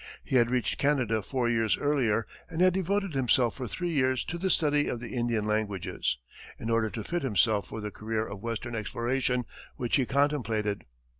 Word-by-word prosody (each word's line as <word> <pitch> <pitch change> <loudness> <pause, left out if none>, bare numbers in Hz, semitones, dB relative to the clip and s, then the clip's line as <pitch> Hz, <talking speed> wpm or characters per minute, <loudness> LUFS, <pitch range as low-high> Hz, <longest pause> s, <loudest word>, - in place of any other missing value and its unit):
He 130 - +2
had 120 -1 +4
reached 125 -1 0
Canada 130 -7 +2
four 125 +4 -1
years 115 -2 +2
earlier 125 -7 +1 0.2
and 165 -1 -5
had 185 0 +5
devoted 190 0 0
himself 125 -2 +3
for 130 -2 -5
three 175 - -3
years 130 -4 +2
to 170 - -5
the 190 +2 0
study 150 -4 +3
of 120 - -2
the 120 - -7
Indian 120 -3 0
languages, 105 -9 -1 0.4
in 115 - -3
order 115 -1 +2
to 110 0 -5
fit 175 +7 -2
himself 110 -4 +2
for 110 - -6
the 105 0 -4
career 110 +1 -2
of 100 -3 -7
western 115 +1 -4
exploration 125 +3 -1 0.3
which 120 +2 +1
he 130 -3 +1
contemplated. 115 -8 0
120 Hz, 190 wpm, -29 LUFS, 110-140 Hz, 0.4 s, had